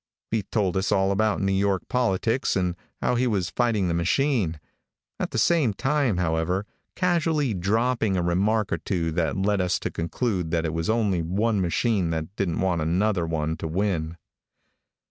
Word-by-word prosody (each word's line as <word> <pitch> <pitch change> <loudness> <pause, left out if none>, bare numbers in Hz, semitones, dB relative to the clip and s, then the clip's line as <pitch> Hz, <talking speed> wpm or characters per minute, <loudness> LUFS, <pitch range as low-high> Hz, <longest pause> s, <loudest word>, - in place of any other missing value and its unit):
He 110 -1 +1
told 100 -2 -1
us 95 - 0
all 95 0 +3
about 105 +1 +1
New 95 0 +1
York 95 -1 +1
politics 120 0 +1
and 90 -2 0 0.3
how - - +2
he 125 +1 +1
was 95 -6 -1
fighting 115 -6 +1
the 85 - 0
machine, 90 - +1 0.6
at - - -1
the - - -4
same 150 -12 +3
time, 135 -6 +1
however, 90 +3 0 0.3
casually 165 - +1
dropping 110 +2 +1
a 90 - 0
remark 100 +5 +1
or - - -1
two 85 -4 -1
that 80 0 -1
led 100 0 +1
us 90 -1 +1
to - - -4
conclude 90 +1 -2
that 85 0 0
it 80 - -2
was 80 +2 -2
only 105 -6 +1
one 100 +5 0
machine 95 +1 +1
that 80 +3 -4
didn't 90 -6 -1
want 90 -3 +1
another 90 +2 +1
one 80 -1 -1
to 80 - -4
win. 85 -2 -1
95 Hz, 175 wpm, -25 LUFS, 85-110 Hz, 0.6 s, all